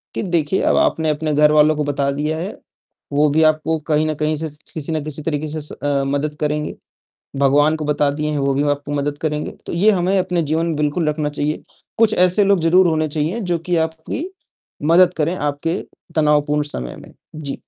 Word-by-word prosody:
कि - - -2
देखिए 170 -2 0
अब - - +3
आपने 160 -1 +2
अपने 150 0 -1
घरवालों 150 +1 +5
को 150 - -1
बता 140 -1 -1
दिया 150 +3 -2
है, 185 +5 -5 0.6
वो 150 +1 +3
भी 160 +2 +3
आपको 155 +1 +2
कहीं 155 +1 +2
न 155 - -1
कहीं 155 0 +1
से 160 0 -3
स 150 +1 -13
किसी 160 0 -5
ना 155 - 0
किसी 155 0 -6
तरीके 155 -1 -2
से 150 - -7
अ, 140 -1 -1
मदद 145 +2 -1
करेंगे। 150 0 -2 0.7
भगवान 145 +3 +4
को 155 - -5
बता 150 -1 +1
दिए 150 +1 -2
हैं, 150 - -1
वो 140 0 +1
भी 140 - +1
आपको 145 0 -3
मदद 145 0 -1
करेंगे। 150 -1 -2 0.2
तो - - -5
ये 195 +6 +4
हमें 190 +1 +1
अपने 180 -2 0
जीवन 160 +2 0
में 165 -2 -1
बिल्कुल 150 +2 0
रखना 150 -1 -1
चाहिए। 150 +1 -2 0.4
कुछ 220 -1 +4
ऐसे 180 +3 +3
लोग 200 -2 +3
ज़रूर 175 +3 +4
होने 155 -1 +1
चाहिए 155 +9 -1
जो 175 -4 -1
कि 175 +1 -2
आपकी 160 - -6 0.7
मदद 180 +1 +5
करें 160 +4 +1
आपके 150 +4 -2 0.4
तनावपूर्ण 150 -1 +2
समय 60 0 -5
में, - - -14 0.2
जी। 145 -3 -5
155 Hz, 205 wpm, -19 LUFS, 145-165 Hz, 0.7 s, घरवालों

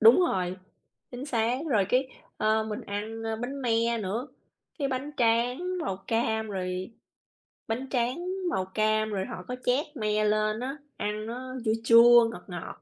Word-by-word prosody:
Đúng 230 +9 +8
rồi, 185 - 0 0.5
chính 250 +2 -6
xác, 240 -2 +1
rồi 205 -5 +4
cái, 260 +1 +2 0.3
ơ, 220 0 +2
mình 215 -1 -4
ăn, 215 +3 -5
ơ, 225 0 -2
bánh 265 +4 -5
me 230 0 +2
nữa, 220 +7 -3 0.5
cái 280 -2 0
bánh 265 +3 -3
tráng 250 +9 +1
màu 195 - -2
cam 220 -1 0
rồi 185 0 -3 0.8
bánh 250 +4 -3
tráng 255 +7 0 0.2
màu 185 - 0
cam 215 +2 +1
rồi 195 -2 -2
họ 185 - -7
có 250 - -3
trét 265 +6 +2
me 215 -1 +1
lên 215 +1 +1
á, 270 +3 -4 0.2
ăn 210 +1 -2
nó 255 +3 -6
chua 220 - +3
chua, 235 0 +8
ngọt 180 - -9
ngọt, 180 -2 -7
225 Hz, 170 wpm, -28 LUFS, 215-250 Hz, 0.8 s, Đúng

